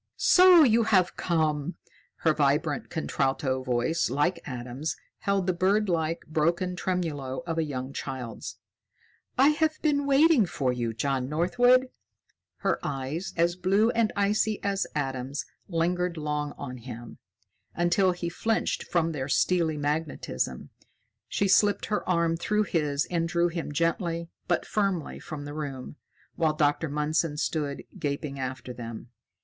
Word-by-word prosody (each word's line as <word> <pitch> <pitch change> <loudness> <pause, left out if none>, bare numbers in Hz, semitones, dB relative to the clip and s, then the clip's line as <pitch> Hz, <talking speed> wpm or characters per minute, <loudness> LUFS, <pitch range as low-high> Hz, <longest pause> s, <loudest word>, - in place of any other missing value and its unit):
"So 360 -3 +7
you 230 -3 +4
have 185 -5 +3
come!" 155 -1 0 0.5
Her - - +3
vibrant - - +1
contralto 130 - -1
voice, 130 +5 0
like 150 +7 +1
Adam's, 125 +3 -4 0.2
held 200 -2 0
the 185 - +1
birdlike, 175 -3 +1
broken 170 +4 0
tremulo 165 -7 -2
of 165 -1 -2
a - - +2
young 135 -2 -5
child's. 130 -5 -6 0.8
"I 270 +3 +6
have 310 +1 +1
been 285 -2 +2
waiting 280 - +5
for 140 -6 -1
you, 120 -2 -2
John 130 +2 -1
Northwood." 245 - +3 0.7
Her - - +1
eyes, 140 +7 -3
as 170 +1 +2
blue 195 +5 +2
and 225 -2 +1
icy 210 +1 +1
as 200 -1 0
Adam's, 135 -1 -3 0.2
lingered 175 0 0
long 150 -1 -2
on 125 0 -6
him, 120 -1 -9 0.6
until 175 +2 +3
he 175 -1 -4
flinched 220 +6 -1
from 165 -2 +1
their 140 -3 -4
steely 165 0 +2
magnetism. 145 - -2 0.6
She 200 - 0
slipped 205 +1 +4
her 210 -3 -2
arm 170 -2 +2
through 210 +5 +1
his 150 -7 0
and 165 -1 +1
drew 170 0 +2
him 165 -3 -4
gently 170 +2 -1 0.2
but 175 - +1
firmly 195 -6 -1
from 150 -3 -7
the 145 - -6
room, 140 -3 -6 0.4
while 160 -2 +1
Dr. 150 +1 +1
Mundson 150 +1 0
stood 150 -2 -2 0.2
gaping 140 -1 -3
after 130 -1 -5
them. 115 0 -8
165 Hz, 140 wpm, -27 LUFS, 140-185 Hz, 0.8 s, So